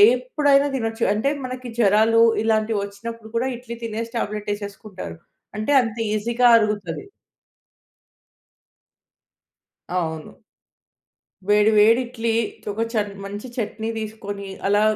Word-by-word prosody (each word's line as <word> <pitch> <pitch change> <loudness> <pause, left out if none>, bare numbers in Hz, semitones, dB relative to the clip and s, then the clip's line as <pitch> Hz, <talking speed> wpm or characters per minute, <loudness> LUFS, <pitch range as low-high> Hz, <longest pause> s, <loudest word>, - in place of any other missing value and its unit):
ఎప్పుడైనా 275 +3 +2
తినొచ్చు. 225 -2 -2
అంటే 220 +6 +1
మనకి 255 0 -6
జ్వరాలు 220 +1 +4 0.2
ఇలాంటివి 220 -1 +1
వచ్చినప్పుడు 220 +3 -8
కూడా 250 +3 +1
ఇడ్లీ 235 -1 -8
తినేసి 230 +1 -4
టాబ్లెట్ 210 -1 -3
ఏసేసుకుంటారు. 200 -2 -8 0.4
అంటే 215 +7 -1
అంత 230 -2 -4 0.2
ఈజీగా 235 +3 +2
అరుగుతది. 210 - 0 2.9
అవును. 160 -2 -4 1.1
వేడి, 210 +1 +5
వేడి 225 +4 +6
ఇడ్లీతో 230 -3 -2 0.2
చన్ 210 -2 0
మంచి 205 +5 -6
చట్నీ 220 0 -3
తీసుకొని, 205 -2 -6 0.2
అలా 205 +1 +3
220 Hz, 100 wpm, -22 LUFS, 205-230 Hz, 2.9 s, వేడి